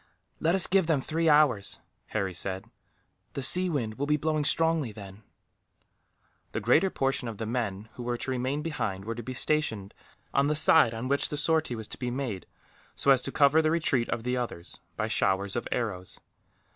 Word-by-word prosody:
"Let 165 +3 +2
us 190 - +7
give 190 -3 +2
them 160 -4 +2
three 160 +4 0
hours," 145 -9 +3 0.3
Harry 100 -4 -2
said, 95 +2 -4 0.7
"the 140 - -4
sea 180 +7 +6
wind 120 -8 -3
will 145 - -1
be 150 0 +2
blowing 155 0 -1
strongly, 160 -6 +2
then." 100 -1 -11 1.3
The - - -1
greater 125 - +3
portion 135 -5 -1
of 110 -3 -6
the 110 - -4
men 110 -3 -3
who - - -9
were 120 0 -2
to 130 - -4
remain 130 +4 -2
behind 100 -12 -3
were 115 - -3
to 120 - -7
be 130 +3 -7
stationed 125 -9 -1 0.4
on 140 +1 +2
the 150 - 0
side 150 -6 +5
on 115 +3 -4
which 140 +1 +1
the 150 - -4
sortie 155 -3 +1
was 110 -1 -7
to - - -6
be 125 -2 -3
made, 120 -7 -4 0.5
so 140 - +2
as 130 -2 +4
to - - -4
cover 145 +2 +4
the 155 - +1
retreat 155 -7 0
of 115 - -3
the 125 +1 -1
others, 115 -8 -6 0.2
by 110 - -1
showers 100 -2 0
of 120 - -3
arrows. 100 -6 -3
125 Hz, 195 wpm, -28 LUFS, 110-150 Hz, 1.3 s, us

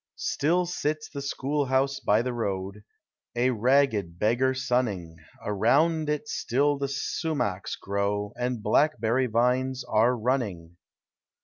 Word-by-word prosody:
Still 175 +5 +1
sits 155 -3 -2
the 140 - -6
school 140 +1 -1
house 135 +1 +1
by 105 +3 +2
the 125 0 -2
road, 100 -2 -3 0.5
A 125 +2 +2
ragged 115 -7 +2
beggar 120 +6 +2
sunning; 120 -11 -1 0.3
Around 150 +10 +2
it 150 0 -2
still 140 +3 0
the 140 - -1
sumachs 140 - -2
grow, 100 +1 -2
And 125 -3 -3
blackberry 120 +1 +2
vines 125 +3 +1
are 115 +3 +2
running. 105 -9 -2
125 Hz, 120 wpm, -27 LUFS, 105-140 Hz, 0.5 s, by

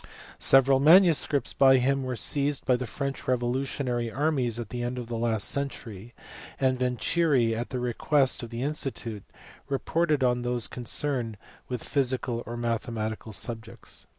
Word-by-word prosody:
Several 135 0 +5
manuscripts 160 -2 +5
by 135 -1 +6
him 135 +2 +1
were 130 -1 -3
seized 140 +3 0
by 130 - +4
the 125 0 -4
French 140 +3 -4
revolutionary 125 -1 -1
armies 135 -4 0
at 115 -3 -5
the 120 +1 -4
end 120 +1 -3
of 125 - -4
the 120 - -3
last 115 -2 0
century, 120 -6 -4 0.4
and 130 -1 +1
"Venturi, 125 0 +1
at 120 +2 -4
the 130 - -3
request 130 +3 +1
of 120 - -7
the 120 +2 -4
Institute, 130 -7 -2 0.5
reported 150 +1 0
on 125 -1 +2
those 120 -1 0
concerned 120 -2 -3 0.3
with 125 -2 -4
physical 130 -3 -1
or 120 +1 -5
mathematical 115 -2 -3
subjects*. 110 +3 -5
125 Hz, 150 wpm, -27 LUFS, 120-140 Hz, 0.5 s, by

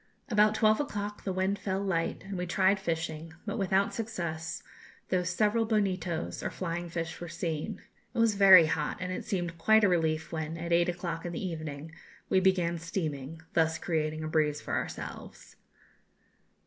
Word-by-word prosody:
About 210 -1 +4
twelve 215 0 +4
o'clock 210 -7 -4
the 195 - 0
wind 190 +2 0
fell 190 -1 -1
light 170 -4 -1
and 195 0 -5
we 180 0 -3
tried 190 +2 +3
fishing, 165 -3 -3
but 210 +1 -3
without 195 0 +2
success, 170 -8 -4 0.5
though 185 -1 +2
several 210 +6 +1
bonitos 185 -6 -1
or - - -2
flying 175 -1 -4
fish 165 -1 -4
were 175 - -5
seen. 160 -3 -3 0.4
It - - -5
was 230 -2 +4
very 190 -4 +9
hot, 150 -1 -1
and 185 0 -3
it 185 - -4
seemed 175 -3 -3
quite 220 +6 +5
a - - +7
relief 160 -3 +1
when, 160 0 -3
at 170 +1 -2
eight 170 +1 +4
o'clock 170 -2 -3
in 175 - -4
the 170 - -3
evening, 155 -2 -6 0.4
we 190 - +4
began 180 -3 +2
steaming, 160 -3 -4
thus 160 0 +2
creating 155 -2 -1
a - - -2
breeze 150 -1 +1
for - - -6
ourselves. - - -5
175 Hz, 175 wpm, -30 LUFS, 160-195 Hz, 0.5 s, very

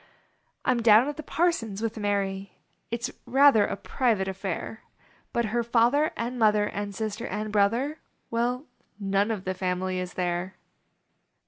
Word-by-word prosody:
I - - +4
m 240 -2 +1
down 225 +3 +6
at 295 - -3
the - - -4
parson 310 - 0
s 195 - -6
with 225 -1 -2
Mary; 200 -2 -2 0.3
It 235 0 -4
s - - -9 0.2
rather 270 -5 +6
a - - -3
private 225 -7 0
aifair; 190 +3 -4 0.5
But 235 0 0
her 240 - +2
father 240 +6 +3
and 240 +2 -3
mother 210 -2 +4
And 205 -1 -4
sister 215 0 -3
and 210 +2 -3
brother 230 +9 +1 0.3
Well 245 +4 0 0.3
none 200 +1 +1
of 210 -4 -2
the 185 - -2
familv 185 0 -2
is 180 -1 -5
there. 180 +1 -2
215 Hz, 160 wpm, -27 LUFS, 195-240 Hz, 0.5 s, down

